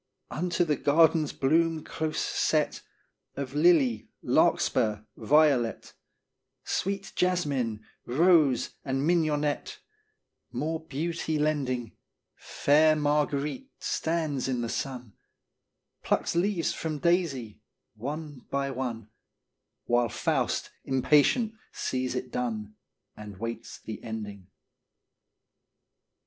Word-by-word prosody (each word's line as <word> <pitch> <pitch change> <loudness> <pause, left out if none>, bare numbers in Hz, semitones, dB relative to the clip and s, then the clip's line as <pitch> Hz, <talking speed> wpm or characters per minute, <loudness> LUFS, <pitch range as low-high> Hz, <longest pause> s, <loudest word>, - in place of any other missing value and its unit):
Unto 175 +2 0
the 150 -3 +1
garden's 160 0 +4
bloom 160 +3 +1
close 160 -1 -3
set - - 0 0.5
Of 135 -1 -5
lily, 145 -8 +3
larkspur, 110 -4 +2
violet, 135 -1 +2 0.7
Sweet 195 0 -2
jasmine, 140 -12 0 0.2
rose, 150 -2 +4
and 135 0 -1
mignonette 155 -3 +1 0.7
More 155 +6 -2
beauty 160 +1 -2
lending, 135 -6 -1 0.4
Fair 155 +2 +3
Marguerite 150 - 0
stands 160 -5 -1
in 125 -2 -1
the 115 - -2
sun, 125 -4 -4 0.9
Plucks - - 0
leaves 175 -1 +1
from 155 -2 -3
daisy, 150 - 0 0.3
one 145 +3 -6
by 140 0 -1
one, 120 -4 -4 0.7
While 120 0 +2
Faust, - - -1
impatient, 150 - +3 0.2
sees 130 0 -2
it 125 - -4
done 110 -4 -3 0.4
And 105 -2 -9
waits 115 +2 -6
the 110 - -7
ending. 105 -4 -6
145 Hz, 95 wpm, -28 LUFS, 120-160 Hz, 0.9 s, garden's